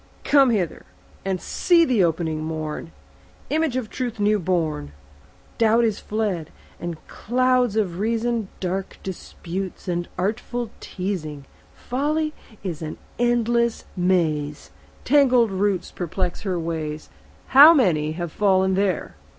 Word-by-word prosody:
come 275 Hz, -3 st, +5 dB
hither 190 Hz, -8 st, -1 dB, 0.4 s
And 190 Hz, -1 st, -1 dB
see 340 Hz, -, +3 dB
the 240 Hz, -, +3 dB
opening 160 Hz, -2 st, 0 dB
morn, 155 Hz, 0 st, -4 dB, 0.6 s
Image 310 Hz, -3 st, +1 dB
of 255 Hz, -4 st, -2 dB
Truth 240 Hz, -1 st, -4 dB
new 210 Hz, +1 st, +3 dB
born. 160 Hz, -, -1 dB, 0.7 s
Doubt 230 Hz, +1 st, +4 dB
is 220 Hz, -3 st, +1 dB
fled, 205 Hz, -7 st, -2 dB, 0.3 s
and 170 Hz, -2 st, -4 dB
clouds 250 Hz, -1 st, +1 dB
of 185 Hz, -5 st, 0 dB
reason, 230 Hz, 0 st, 0 dB
Dark 190 Hz, +1 st, -3 dB
disputes 190 Hz, 0 st, -6 dB
and 175 Hz, -1 st, -1 dB
artful 220 Hz, +4 st, -2 dB
teazing. 170 Hz, -7 st, -4 dB, 0.3 s
Folly 305 Hz, +4 st, -1 dB, 0.3 s
is 170 Hz, -5 st, -4 dB
an 155 Hz, -1 st, -5 dB, 0.2 s
endless 235 Hz, -1 st, +1 dB
maze; 155 Hz, -, 0 dB, 0.3 s
Tangled 255 Hz, -5 st, +4 dB
roots 195 Hz, -1 st, 0 dB
perplex 180 Hz, +1 st, -3 dB
her 190 Hz, -3 st, -2 dB
ways; 155 Hz, -2 st, -4 dB, 0.4 s
How 285 Hz, +4 st, +10 dB
many 165 Hz, -, +2 dB
have 175 Hz, 0 st, -4 dB
fallen 190 Hz, -1 st, +2 dB
there! 190 Hz, -2 st, 0 dB
195 Hz, 120 wpm, -23 LUFS, 170-235 Hz, 0.7 s, How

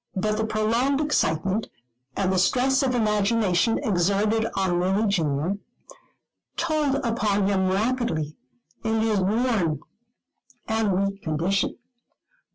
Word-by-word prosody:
But 210 Hz, +3 st, 0 dB
the 220 Hz, -, 0 dB
prolonged 230 Hz, +6 st, +1 dB
excitement, 195 Hz, -, 0 dB, 0.5 s
and 190 Hz, -1 st, +1 dB
the 185 Hz, -, +2 dB
stress 260 Hz, +8 st, +2 dB
of 260 Hz, -2 st, 0 dB
imagination 210 Hz, -2 st, +2 dB
exerted 205 Hz, +3 st, +1 dB
on 185 Hz, -2 st, +1 dB
Lily 190 Hz, +4 st, +1 dB
junior, 165 Hz, 0 st, 0 dB, 1.0 s
told 310 Hz, -4 st, +1 dB
upon 215 Hz, -4 st, +1 dB
him 190 Hz, -1 st, +1 dB
rapidly 195 Hz, -, -1 dB, 0.5 s
in 225 Hz, -1 st, 0 dB
his 220 Hz, -2 st, +1 dB
worn 200 Hz, -, +1 dB, 0.9 s
and 210 Hz, -4 st, +1 dB
weak 195 Hz, 0 st, -4 dB
condition. 170 Hz, +5 st, -1 dB
205 Hz, 110 wpm, -24 LUFS, 185-230 Hz, 1.0 s, the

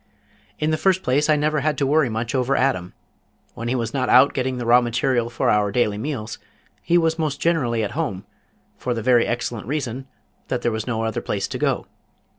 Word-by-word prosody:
"In 155 Hz, +1 st, 0 dB
the 155 Hz, -, +1 dB
first 190 Hz, -1 st, +2 dB
place 145 Hz, +4 st, +1 dB
I 155 Hz, -, +5 dB
never 150 Hz, +1 st, +1 dB
had 150 Hz, +1 st, 0 dB
to 140 Hz, -, +1 dB
worry 145 Hz, -1 st, +3 dB
much 115 Hz, +2 st, -3 dB
over 130 Hz, +1 st, +1 dB
Adam. 125 Hz, -10 st, 0 dB, 0.6 s
When 115 Hz, -, -6 dB
he 125 Hz, -, 0 dB
was 115 Hz, -2 st, -2 dB
not 130 Hz, -2 st, -1 dB
out 130 Hz, +3 st, +6 dB
getting 130 Hz, -1 st, -1 dB
the 120 Hz, -, -4 dB
raw 120 Hz, +1 st, +6 dB
material 120 Hz, 0 st, 0 dB
for 120 Hz, -, 0 dB
our 105 Hz, -1 st, +2 dB
daily 105 Hz, -2 st, 0 dB
meals 115 Hz, -4 st, -4 dB, 0.4 s
he 175 Hz, -, +2 dB
was 165 Hz, -1 st, +1 dB
most 155 Hz, -3 st, -1 dB
generally 125 Hz, -10 st, +1 dB
at 105 Hz, -, -3 dB
home, 140 Hz, -, -3 dB, 0.5 s
for 125 Hz, -1 st, -2 dB
the 115 Hz, -, -4 dB
very 120 Hz, -2 st, +4 dB
excellent 120 Hz, -2 st, -3 dB
reason 135 Hz, -2 st, -3 dB, 0.4 s
that 125 Hz, -2 st, -2 dB
there 120 Hz, -, +1 dB
was 110 Hz, +2 st, -4 dB
no 115 Hz, -2 st, -1 dB
other 110 Hz, -1 st, -2 dB
place -, -, -2 dB
to -, -, -5 dB
go. -, -, 0 dB
125 Hz, 215 wpm, -22 LUFS, 115-145 Hz, 0.6 s, out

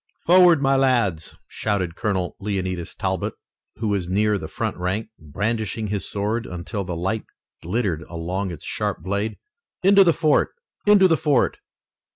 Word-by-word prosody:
"Forward, 175 Hz, -4 st, +6 dB
my 135 Hz, 0 st, +3 dB
lads!" 120 Hz, -, +1 dB
shouted 95 Hz, -6 st, -2 dB
Colonel 95 Hz, -3 st, -1 dB
Leonidas 95 Hz, -4 st, -3 dB
Talbot, -, -, -2 dB, 0.4 s
who 110 Hz, -2 st, -2 dB
was 95 Hz, -4 st, -1 dB
near 105 Hz, +2 st, +2 dB
the -, -, -6 dB
front -, -, -3 dB
rank, 95 Hz, +5 st, -2 dB
brandishing 105 Hz, +6 st, -2 dB
his 100 Hz, -1 st, -2 dB
sword 105 Hz, +3 st, -2 dB
until 90 Hz, +4 st, -4 dB
the 90 Hz, -2 st, -4 dB
light 95 Hz, +6 st, -2 dB, 0.4 s
glittered 95 Hz, -3 st, -1 dB
along 90 Hz, +4 st, -3 dB
its 85 Hz, -, -8 dB
sharp -, -, -3 dB
blade. 100 Hz, +3 st, -2 dB, 0.5 s
"Into 195 Hz, +1 st, +7 dB
the 175 Hz, -, +5 dB
fort! 155 Hz, -2 st, +2 dB, 0.3 s
Into 205 Hz, -2 st, +7 dB
the 165 Hz, -3 st, +3 dB
fort!" 140 Hz, -3 st, +1 dB
105 Hz, 150 wpm, -23 LUFS, 90-120 Hz, 0.5 s, Into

